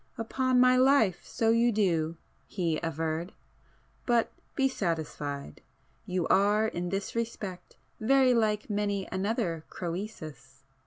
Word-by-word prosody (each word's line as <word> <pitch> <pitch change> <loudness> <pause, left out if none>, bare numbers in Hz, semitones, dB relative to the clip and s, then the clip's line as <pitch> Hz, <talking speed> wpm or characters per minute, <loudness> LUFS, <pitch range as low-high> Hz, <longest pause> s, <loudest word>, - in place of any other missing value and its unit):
"Upon 255 +2 +1
my 255 0 +6
life, 255 -9 +4
so 225 -1 +1
you 235 +1 +4
do!" 170 -6 +1 0.3
he 170 -5 -1
averred.—"But 165 - -3 0.2
be 270 - +3
satisfied!—you 160 - -4
are 205 +2 +4
in 175 -4 -3
this 195 +1 -3
respect 210 -6 -5 0.2
very 260 +2 +4
like 215 -3 +1
many 205 -2 -1
another 190 -4 -1
Crœsus. 160 -7 -7
200 Hz, 105 wpm, -29 LUFS, 165-230 Hz, 0.3 s, my